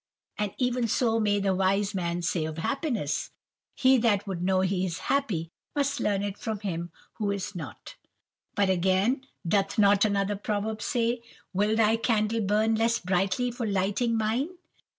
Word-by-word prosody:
For 210 -1 0
even 250 -2 +1
so 225 0 +2
may 205 -2 +2
the 195 -1 +1
wise 195 +2 +1
man 175 -2 -2
say 165 -1 0
of 155 0 -5
happiness, 215 - -1 0.5
"He 260 -1 +5
that 215 -4 +2
would 190 -4 -4
know 185 +1 +2
he 190 0 0
is 180 -2 -2 0.2
happy, 195 - -1 0.2
must 285 -1 0
learn 200 -1 0
it 205 0 -4
from 215 -2 -4
him 175 -4 -3 0.3
who 210 -2 0
is 200 -1 -3
not." 160 -7 -8 0.6
But 200 -1 +3
again, 190 +9 +1 0.2
doth 195 +2 +1
not 200 -1 +5
another 200 -1 +1
proverb 215 +1 -2
say, 240 -2 0 0.3
"Will 205 +3 +2
thy 220 0 +4
candle 225 -1 +1
burn 215 +2 +2
less 230 +1 +2
brightly 190 +6 0
for 240 -1 -3
lighting 205 +4 +1
mine?" 225 +8 0
205 Hz, 165 wpm, -27 LUFS, 190-225 Hz, 0.6 s, He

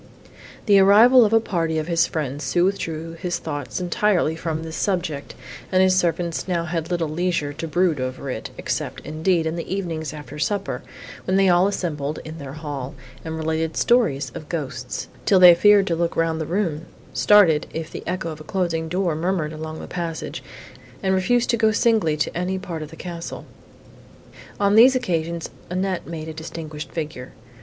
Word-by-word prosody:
The 200 -2 +6
arrival 225 +6 +7
of 210 - 0
a 225 - +6
party 165 -7 -1
of 155 - -1
his 170 -1 +2
friends 145 -2 -3
soon 175 0 +2
withdrew 165 -4 -2
his 175 -2 -1
thoughts 145 -3 -5
entirely 180 -2 +1
from 160 -1 -3
this 160 0 -6
subject, 175 -7 -2 0.4
and 185 0 +4
his 185 0 +4
servants 170 -2 0
had - - -23
now 170 -1 0
little 170 -2 0
leisure 155 -2 -1
to 165 - -5
brood 170 -2 +1
over 130 +2 -4
it, - - -5
except, - - -3
indeed, 160 +2 0
in 160 +1 -2
the 170 - -6
evenings 170 -5 -3
after 150 -1 -9
supper, 200 +4 -1 0.4
when 185 +1 +2
they 195 -1 +4
all 180 +2 +5
assembled 155 -7 -2
in 160 +1 -8
their 140 -2 -7
hall, 145 -3 -6 0.3
and 160 0 -5
related 160 0 -2
stories 145 - +2
of 155 - -9
ghosts, 155 -6 -4 0.2
till 195 - +6
they 180 -1 +10
feared 205 +3 +5
to 170 - 0
look 170 0 -1
round 165 -1 0
the 155 - -3
room; 170 -4 -1 0.3
started, 185 -8 +5
if 160 -1 -5
the - - -6
echo 180 -2 -2
of 155 0 -9
a - - -8
closing 165 -2 -1
door 180 -1 0
murmured 165 -2 -1
along 155 0 -6
the - - -7
passage, 170 -3 -5 0.6
and 190 0 +2
refused 240 +7 +2
to 235 - +1
go 220 0 +3
singly 215 -9 +2
to 150 - -1
any 180 +2 -1
part 170 -4 -6
of 155 - -6
the 160 - -11
castle. 170 0 -7 1.1
On 200 0 +3
these 245 +5 +7
occasions 170 -8 -2 0.2
Annette 185 0 -2
made 160 -1 -6
a 160 - -5
distinguished 155 -1 -7
figure. 150 -6 -6
170 Hz, 185 wpm, -22 LUFS, 155-185 Hz, 1.1 s, they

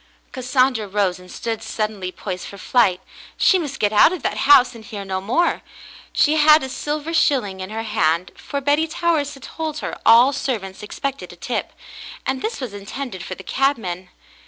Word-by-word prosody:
Cassandra 255 -3 +1
rose 190 -2 0
and 180 0 -14
stood 225 -1 -4
suddenly 215 -4 -3
poised 185 -1 -6
for 200 - -10
flight. 195 -3 +2 0.4
She 380 - +4
must 285 -5 -5
get 205 0 +1
out 210 - +7
of 360 -7 -5
that - - -1
house 255 -3 +7
and 230 -2 -12
hear 205 -2 -7
no 190 -1 -3
more. 255 - +1 0.5
She 310 +1 +3
had 305 0 +6
a 265 - -4
silver 300 +4 -3
shilling 245 -12 +2
in 185 0 -6
her 220 +1 -4
hand, 175 -5 0
for 280 - -5
Betty 290 +3 +2
Towers 315 -3 0
had 275 - -15
told 315 -2 -5
her - - -4
all 240 +5 +7
servants 200 -9 -3
expected 275 +6 -5
a - - -12
tip, - - -3 0.5
and 265 -1 -1
this 455 - -3
was 250 -6 -5
intended 205 0 -6
for 185 - -6
the 190 - -11
cabman. 190 -8 -1
235 Hz, 185 wpm, -21 LUFS, 195-285 Hz, 0.5 s, out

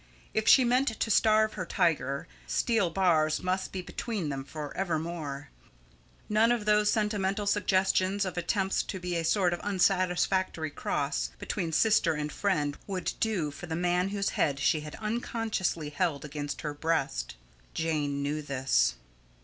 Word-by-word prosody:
If 220 - 0
she 265 - +8
meant 250 +3 +2
to 225 - 0
starve 215 0 +4
her 185 -3 -4
tiger, 160 -7 0 0.2
steel 225 -7 +1
bars 165 -4 +2
must 185 +1 -1
be 185 -1 -4
between 200 -4 -4
them 135 -1 -3
for 145 0 -7
evermore. 160 -5 -3 0.8
None 220 +2 +3
of 235 -3 0
those 210 0 +4
sentimental 210 -2 0
suggestions 195 -1 +2
of 185 - -4
attempts 190 +2 0
to 190 - -5
be 180 -1 -3
a 165 - 0
sort 180 +1 +2
of 175 - -3
unsatisfactory 185 -3 +1
cross 140 0 -2
between 170 -5 -3
sister 170 -3 +3
and 150 0 -3
friend 150 -8 -1
would 185 -3 -2
do 190 -10 0
for 175 +5 -9
the 160 - -3
man 180 +2 +1
whose 200 0 -1
head 140 -2 0
she 155 +3 +2
had 150 0 -8
unconsciously 215 -8 -2
held 145 -1 -1
against 145 0 -5
her 150 -1 -3
breast. 105 - -1 0.4
Jane 145 -3 -1
knew 150 +2 -1
this. 135 - +1
180 Hz, 155 wpm, -29 LUFS, 150-205 Hz, 0.8 s, she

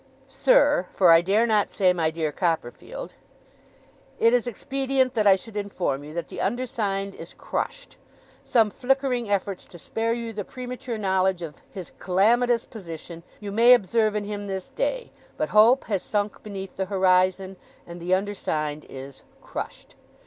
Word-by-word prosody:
'SIR 295 - +3
for 180 -3 +5
I 165 0 +8
dare 200 +6 +2
not 215 -3 +2
say 185 -3 +3
my 165 -3 +1
dear 160 -1 -2
Copperfield, 175 - -3 1.0
'It 230 +1 +4
is 245 0 +2
expedient 265 +2 0
that 215 -3 +2
I 195 - +8
should 210 +3 -10
inform 185 -9 -2
you 150 - -9
that 170 - -3
the - - -6
undersigned 200 -3 -2
is 165 - -11
Crushed. - - -5 0.5
Some 225 -3 +3
flickering 255 -2 0
efforts 200 -1 -1
to 175 - -13
spare 225 +7 -2
you 230 -1 -4
the 205 -1 -4
premature 250 0 -6
knowledge 190 -3 +1
of 155 -3 -8
his 185 -3 -8
calamitous 230 +6 +2
position, 170 -4 -9 0.2
you 205 -1 -6
may 235 +4 +7
observe 215 0 +1
in 210 - -1
him 205 0 -5
this 190 -1 -5
day; - - -2 0.3
but 305 - -1
hope 230 +5 +6
has 200 -5 -2
sunk 205 -1 -2
beneath 195 -2 -8
the 190 - -1
horizon, 185 0 +2 0.3
and 170 0 -10
the 180 +2 +2
undersigned 155 -7 -3
is 135 0 -9 0.2
Crushed. - - -8
205 Hz, 160 wpm, -25 LUFS, 185-235 Hz, 1.0 s, I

